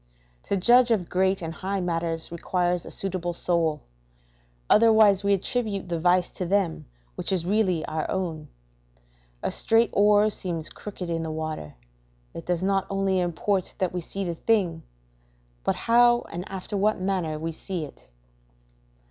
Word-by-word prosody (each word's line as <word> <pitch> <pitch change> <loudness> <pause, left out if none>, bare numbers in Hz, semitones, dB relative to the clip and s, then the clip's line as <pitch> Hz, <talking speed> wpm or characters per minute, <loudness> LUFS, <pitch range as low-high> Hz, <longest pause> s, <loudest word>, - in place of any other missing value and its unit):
To 200 - 0
judge 240 +6 +5
of 205 -7 +1
great, 190 0 +1
and 165 0 -4
high 195 +3 -3
matters 165 -2 -2
requires 175 +1 -1
a - - -6
suitable 180 -3 -3
soul; 165 -4 +1 0.9
otherwise 215 -3 +5
we 200 - +2
attribute 200 -2 -3
the 170 -1 -1
vice 180 +1 +3
to 180 - -5
them 190 -3 0 0.3
which - - -3
is 180 -3 0
really 185 -4 +1
our 155 0 -3
own. 165 -5 -3 1.0
A - - 0
straight 225 0 +3
oar 210 +1 +4
seems 170 -6 -3
crooked 195 -3 -7
in 165 0 -1
the 160 - -4
water 155 - -5 0.6
it 165 - -9
does 175 0 0
not 195 0 +1
only 195 -1 +1
import 180 +2 -1
that 185 -3 -1
we 180 - -2
see 195 +4 -4
the 175 -2 -2
thing, 175 -3 0 0.8
but - - +1
how 240 +1 +4
and 175 +2 -6
after 190 +2 -6
what 205 +1 +1
manner 185 -5 -1
we 165 +2 -3
see 170 0 -5
it. 140 - -16
185 Hz, 155 wpm, -25 LUFS, 165-200 Hz, 1.0 s, judge